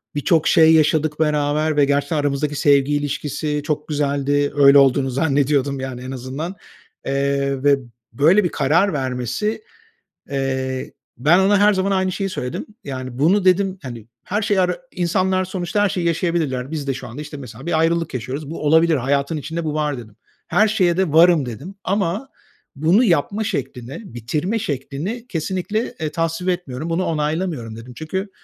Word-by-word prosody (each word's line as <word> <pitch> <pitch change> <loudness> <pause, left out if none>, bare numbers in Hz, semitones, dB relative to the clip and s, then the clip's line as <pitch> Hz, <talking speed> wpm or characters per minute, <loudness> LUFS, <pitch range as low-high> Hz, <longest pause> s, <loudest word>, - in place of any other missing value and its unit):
birçok 155 +2 +2
şey 160 -1 +6
yaşadık 155 -1 +2
beraber 150 0 +1
ve 145 - +5
gerçekten 145 +2 0
aramızdaki 145 0 -1
sevgi 140 0 +3
ilişkisi 145 +1 -2
çok 150 -1 -2
güzeldi. 145 -1 0
Öyle 140 -1 +7
olduğunu 135 0 +3
zannediyordum, 140 0 +1
yani 130 -2 -5
en 130 - -6
azından. 135 +8 -5 0.5
Eee, 140 0 0
ve 140 -1 +4 0.3
böyle 165 - +4
bir 175 - +1
karar 160 +8 +2
vermesi, 130 - -2 0.7
eee, 130 -1 -2 0.2
ben 155 +8 +4
ona 200 +2 +4
her 210 +1 +5
zaman 190 +1 0
aynı 190 -1 +1
şeyi 195 +1 -2
söyledim. 125 -8 -4 0.2
Yani, 130 -4 -6
bunu 185 +7 +3
dedim, 190 +1 +2
hani, 120 -6 -8 0.2
her 210 +3 -2
şeyi 205 -2 +2
ara 180 0 +1
“İnsanlar 185 +1 0
sonuçta 185 +1 -2
her 205 - +3
şeyi 175 -2 -1
yaşayabilirler. 160 -6 -1
Biz 150 -3 -4
de 135 - +1
şu 125 - -7
anda, 120 +6 -8
işte, 150 0 -8
mesela 125 -2 -10
bir 165 -2 +1
ayrılık 165 0 +1
yaşıyoruz. 135 +4 -5
Bu 160 - -5
olabilir. 160 +2 +4
Hayatın 140 +4 0
içinde 165 +3 -4
bu 155 -2 -2
var.” 150 -2 -1
dedim. 110 -3 -11 0.3
“Her 215 - +3
şeye 185 -5 +2
de 185 -6 +1
varım.” 165 -2 +6
dedim 140 - -8
ama 200 +6 -1 0.5
“Bunu 165 - +3
yapma 200 - +1
şeklini, 135 - -4
bitirme 150 - -2
şeklini 160 - -4
kesinlikle, 190 +5 -2
eee, 155 -1 -2
tasvip 165 +3 -1
etmiyorum. 165 -4 -3
Bunu 170 +3 0
onaylamıyorum.” 150 -6 -2
dedim. 120 +2 -10
Çünkü 190 +6 -4
150 Hz, 165 wpm, -20 LUFS, 140-180 Hz, 0.7 s, Öyle